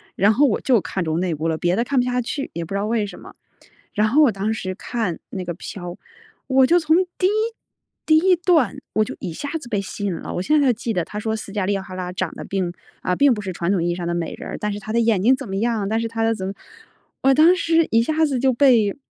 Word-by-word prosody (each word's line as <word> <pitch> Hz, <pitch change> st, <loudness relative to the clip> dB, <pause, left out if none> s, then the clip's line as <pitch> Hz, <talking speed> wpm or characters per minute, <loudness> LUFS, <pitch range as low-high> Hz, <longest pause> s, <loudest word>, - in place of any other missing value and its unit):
然 205 Hz, +4 st, +4 dB
后 285 Hz, +6 st, +4 dB
我 230 Hz, -, +1 dB
就 250 Hz, -4 st, +3 dB
看 190 Hz, -1 st, -3 dB
中 160 Hz, 0 st, -1 dB
那 175 Hz, -3 st, -1 dB
部 160 Hz, +2 st, -2 dB
了， 160 Hz, -, -1 dB
别 175 Hz, +2 st, +1 dB
的 230 Hz, -, +1 dB
看 265 Hz, +1 st, 0 dB
不 245 Hz, -, +2 dB
下 250 Hz, 0 st, 0 dB
去， 275 Hz, +4 st, -4 dB
也 170 Hz, -, -4 dB
不 170 Hz, -, -7 dB
知 200 Hz, -, 0 dB
道 205 Hz, -, -1 dB
为 220 Hz, -1 st, 0 dB
什 200 Hz, -, -9 dB
么。 -, -, -13 dB, 0.6 s
然 210 Hz, +1 st, +2 dB
后 280 Hz, +8 st, +4 dB
我 265 Hz, -, +5 dB
当 205 Hz, +3 st, -2 dB
时 185 Hz, -4 st, -4 dB
看 215 Hz, -3 st, -3 dB
那 190 Hz, -, -5 dB
个 175 Hz, -1 st, -4 dB
《飘》， 180 Hz, -2 st, -7 dB, 0.6 s
我 265 Hz, 0 st, +5 dB
就 350 Hz, +4 st, +5 dB
从 315 Hz, -1 st, +3 dB, 0.2 s
第 370 Hz, -, +3 dB
1 -, -, +2 dB, 0.8 s
第 315 Hz, -, +5 dB
1 365 Hz, +3 st, +4 dB
段 330 Hz, -, +2 dB, 0.2 s
我 215 Hz, -, +3 dB
就 -, -, -7 dB
一 180 Hz, -, -5 dB
下 285 Hz, -, -5 dB
子 275 Hz, -, -11 dB
被 205 Hz, -3 st, 0 dB
吸 205 Hz, +1 st, -6 dB
引 190 Hz, -, 0 dB
了。 -, -, -6 dB
我 180 Hz, -, -1 dB
现 300 Hz, +10 st, +3 dB
在 285 Hz, -, +3 dB
还 -, -, +5 dB
记 225 Hz, +1 st, -3 dB
得， 180 Hz, -4 st, 0 dB
它 210 Hz, -, -6 dB
说 220 Hz, +1 st, -2 dB
思 215 Hz, -, -7 dB
嘉 200 Hz, -2 st, -1 dB
丽· 200 Hz, -, +1 dB
塔 185 Hz, -1 st, -9 dB
拉 180 Hz, -1 st, -4 dB
长 -, -, -2 dB
得 -, -, -7 dB
并 190 Hz, -3 st, -2 dB, 0.3 s
呃， 180 Hz, -, 0 dB
并 280 Hz, +1 st, +5 dB
不 210 Hz, -, -4 dB
是 190 Hz, -, -4 dB
传 170 Hz, +1 st, -1 dB
统 185 Hz, -4 st, +1 dB
意 175 Hz, -, 0 dB
义 -, -, -2 dB
上 175 Hz, -1 st, -4 dB
的 170 Hz, -, -1 dB
美 170 Hz, -1 st, -3 dB
人 -, -, -8 dB
儿， -, -, -5 dB
但 210 Hz, -, -2 dB
是 205 Hz, -, -5 dB
她 215 Hz, +2 st, -6 dB
的 235 Hz, -, +3 dB
眼 225 Hz, -5 st, +2 dB
睛 255 Hz, +4 st, +5 dB
怎 265 Hz, -1 st, -8 dB
么 195 Hz, -, -2 dB
样？ 220 Hz, -2 st, 0 dB
但 225 Hz, +1 st, +1 dB
是 230 Hz, -, -1 dB
她 225 Hz, 0 st, -2 dB
的 225 Hz, 0 st, +2 dB
怎 190 Hz, -2 st, -4 dB
么 195 Hz, -, -4 dB, 0.7 s
我 270 Hz, +1 st, +5 dB
当 315 Hz, +5 st, +6 dB
时 330 Hz, -2 st, +2 dB
一 230 Hz, -, +4 dB
下 315 Hz, +5 st, +1 dB
子 275 Hz, -4 st, -1 dB
就 260 Hz, +1 st, +3 dB
被 235 Hz, -6 st, +4 dB
220 Hz, 310 characters per minute, -21 LUFS, 190-260 Hz, 0.8 s, 当